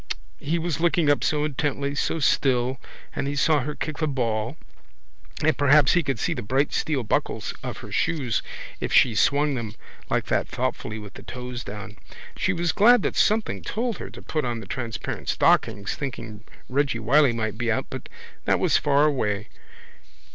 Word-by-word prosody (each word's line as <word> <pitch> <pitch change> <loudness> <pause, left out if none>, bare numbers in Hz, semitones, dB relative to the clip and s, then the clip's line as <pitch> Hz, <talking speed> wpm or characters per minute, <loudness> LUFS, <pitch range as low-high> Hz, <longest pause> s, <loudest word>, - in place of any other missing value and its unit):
He 155 +4 -1
was 165 -2 -2
looking 165 -3 +3
up 145 - +1
so 150 -1 +1
intently, 140 -1 -1
so 145 - 0
still, 130 -3 +2 0.4
and 140 - -1
he 145 - -2
saw 150 +1 +3
her 150 +3 -3
kick 155 -2 -4
the 155 - +1
ball 120 -1 -1 0.9
and 155 +1 +4
perhaps 145 0 +5
he 175 - +4
could 135 -5 -2
see - - 0
the 125 - -4
bright 135 +6 0
steel 145 -5 0
buckles 105 - -1
of - - -5
her - - -11
shoes 140 -9 0 0.4
if - - -3
she 130 -3 +5
swung 140 +8 +3
them 115 -4 -4 0.3
like - - +1
that - - 0
thoughtfully 110 - -3
with 105 -2 -9
the - - -10
toes 125 -1 -6
down. 105 +1 -8 0.4
She - - +1
was 170 0 0
glad 235 +2 +6
that - - -1
something 215 0 +2
told 230 -2 -2
her - - -6
to - - -12
put 155 -1 -2
on 120 -2 -2
the - - -9
transparent 115 -4 -4
stockings 100 0 +2
thinking 115 -6 -6 0.2
Reggy 135 -2 +1
Wylie 130 +5 +4
might 110 -1 -3
be 120 -1 +1
out 110 - 0
but - - -7 0.4
that - - +3
was - - +3
far 145 +1 +3
away. 105 -8 0
135 Hz, 185 wpm, -25 LUFS, 115-150 Hz, 0.9 s, glad